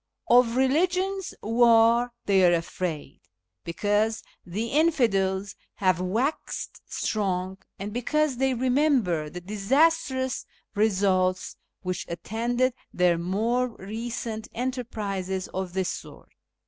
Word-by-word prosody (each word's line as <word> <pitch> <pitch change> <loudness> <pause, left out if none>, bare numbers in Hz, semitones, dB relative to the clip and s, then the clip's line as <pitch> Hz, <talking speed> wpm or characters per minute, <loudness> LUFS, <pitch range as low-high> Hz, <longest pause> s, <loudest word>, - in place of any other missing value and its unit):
Of 245 0 +5
Eeligious 365 +8 +1
War 230 +1 +4
they 195 -2 +4
are 175 -1 +6
afraid, 165 -2 -5 0.4
because 205 +5 0 0.2
the 210 +7 -4
infidels 205 - +1 0.2
have 185 -3 +1
waxed 225 +11 -2
strong, 190 -2 -1 0.2
and 200 +1 -6
because 280 +3 0
they 265 0 +1
remember 250 - +1
the 180 +3 -8
disastrous 260 - +1 0.3
results 190 -3 +1 0.3
which 185 -1 -3
attended 235 +8 -1 0.2
their 175 -2 +2
more 225 +8 0
recent 225 0 -5
enterprises 210 -7 -3
of 185 -2 -4
this 190 -1 0
sort. - - -9
220 Hz, 100 wpm, -26 LUFS, 190-250 Hz, 0.4 s, are